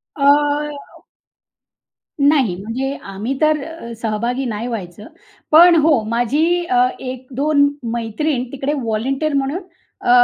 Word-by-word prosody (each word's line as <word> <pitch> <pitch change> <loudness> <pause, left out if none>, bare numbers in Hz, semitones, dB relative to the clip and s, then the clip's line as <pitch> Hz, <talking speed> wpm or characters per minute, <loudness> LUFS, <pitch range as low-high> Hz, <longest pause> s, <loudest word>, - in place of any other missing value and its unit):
अ 280 - -3 2.0
नाही, 280 - +3
म्हणजे 255 +6 -3
आम्ही 200 +6 -4
तर 310 -1 +3
अ, 325 -7 -8
सहभागी 235 +4 -2
नाही 225 0 -3
व्हायचं. 210 -3 -6 0.4
पण 340 +3 +8
हो, 295 -6 +3
माझी, 295 +10 +1
अ, 250 -4 +3
1-2 265 +3 0 0.3
मैत्रीण 240 +4 -1
तिकडे 275 +1 -2
वॉलंटियर 265 +7 -1
म्हणून, 280 +6 -1 0.4
अ, - - -2
260 Hz, 110 wpm, -19 LUFS, 230-300 Hz, 2.0 s, पण